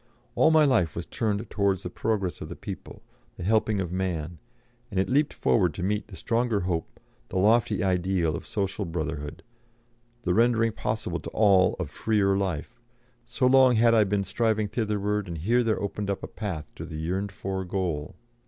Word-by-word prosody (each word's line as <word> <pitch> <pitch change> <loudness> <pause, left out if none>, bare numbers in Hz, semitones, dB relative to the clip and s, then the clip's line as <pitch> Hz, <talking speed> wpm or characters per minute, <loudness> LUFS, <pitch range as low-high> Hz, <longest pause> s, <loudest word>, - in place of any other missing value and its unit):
All 155 - +4
my 160 -1 +5
life 110 - +2
was 85 - -4
turned 110 -1 -2
towards 100 -3 +1
the 90 - -4
progress 100 -4 -2
of - - -6
the - - -6
people, - - -8 0.3
the - - -6
helping 110 +1 +2
of 90 -3 -2
man, 90 -3 -3 0.5
and 100 -5 -1
it 95 - +1
leaped 145 +3 +2
forward 90 -9 +1
to 90 - -4
meet 105 +2 -1
the 95 - -11
stronger 115 0 0
hope, 85 -2 -3 0.3
the - - -3
lofty 110 +2 +3
ideal 90 -3 +1
of - - -7
social 100 0 -2
brotherhood, 80 -3 -4 0.8
the 90 - +1
rendering 115 +1 +3
possible 105 -5 -3
to - - -7
all 100 -4 +4
of 85 -6 -4
freer 100 +1 +1
life; 95 +4 -3 0.5
so 125 +2 0
long 130 -1 +6
had 115 +1 +5
I 110 -2 +6
been 100 0 0
striving 110 +2 0
thitherward, 105 -2 -1
and 85 -2 -5
here 115 +10 +2
there 110 -2 +1
opened 100 0 -3
up 100 - -2
a - - -4
path 85 -9 -6
to - - -6
the 80 - -6
yearned 95 +5 -2
for 95 -1 -4
goal! 90 -6 -3
100 Hz, 185 wpm, -27 LUFS, 90-110 Hz, 0.8 s, long